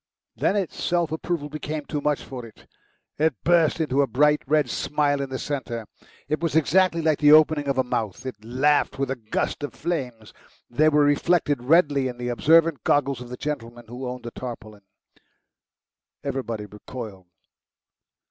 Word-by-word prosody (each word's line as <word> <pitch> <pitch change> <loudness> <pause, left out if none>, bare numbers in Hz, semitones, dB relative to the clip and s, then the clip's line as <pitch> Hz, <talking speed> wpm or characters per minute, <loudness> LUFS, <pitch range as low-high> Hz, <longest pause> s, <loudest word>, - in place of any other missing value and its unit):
Then - - +1
its 195 -5 -2
self 170 -3 +1
approval 160 -1 -3
became 150 0 -5
too 150 - -3
much 150 -1 0
for 130 -2 -8
it; 115 -2 -14 0.5
it 155 -2 +2
burst 170 -1 +3
into 145 -3 +1
a 140 - +2
bright 150 +3 +3
red 150 -1 +3
smile 145 +2 0
in 135 - -4
the 130 - -3
centre. 130 -6 -4 0.4
It 155 +2 -1
was 165 -2 -2
exactly 170 +2 +3
like 155 -2 +2
the 150 0 +7
opening 155 -2 +5
of 140 - 0
a 130 - +3
mouth. 115 -1 -3
It 105 -5 -7
laughed 130 +5 +1
with 135 -1 -1
a - - -1
gust 110 +2 -3
of 145 - -5
flames. 125 -10 -4 0.4
They 155 +6 +4
were 150 -1 +4
reflected 145 -1 +2
redly 145 -1 +3
in 125 -1 -6
the 125 0 -4
observant 160 +5 +3
goggles 140 -3 +1
of 125 - -9
the 125 - -7
gentleman 120 -5 -5
who 125 +2 -6
owned 125 0 -7
the 120 - -6
tarpaulin. 110 -5 -8 1.4
Everybody 125 -6 -3
recoiled. 105 -2 -9
140 Hz, 170 wpm, -24 LUFS, 125-155 Hz, 1.4 s, the